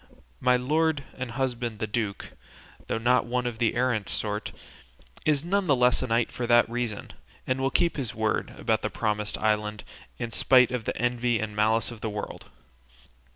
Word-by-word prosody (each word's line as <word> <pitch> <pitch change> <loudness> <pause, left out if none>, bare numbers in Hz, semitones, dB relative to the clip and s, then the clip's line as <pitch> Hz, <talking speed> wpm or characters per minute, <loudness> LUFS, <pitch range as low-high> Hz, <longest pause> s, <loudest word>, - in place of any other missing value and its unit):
My 125 0 +4
lord 150 +3 +1
and 130 -1 -5
husband 120 -2 -2
the 110 - -2
duke, 105 -2 -3 0.6
though - - -1
not 120 +2 +2
one 125 +1 -1
of 120 -2 -3
the 115 -2 +2
errant 120 -4 0
sort, 105 0 -2 0.7
is 150 -2 +2
none 195 +1 +1
the 145 - +5
less 125 0 +3
a 130 - -2
knight 115 0 +1
for 120 - -3
that 120 0 +5
reason, 115 -3 -4 0.3
and 130 +1 -1
will 135 - +2
keep 170 +3 +1
his 130 -6 -3
word 110 0 -1
about - - 0
the - - -1
promised 105 -1 -2
island, 105 -1 0 0.3
in 120 -1 -4
spite 125 +2 +5
of 125 -3 -3
the - - -2
envy 120 0 +1
and 105 -1 -4
malice 110 +2 +2
of 115 -2 -10
the 110 - -2
world. 105 0 -6
120 Hz, 185 wpm, -27 LUFS, 110-125 Hz, 0.7 s, the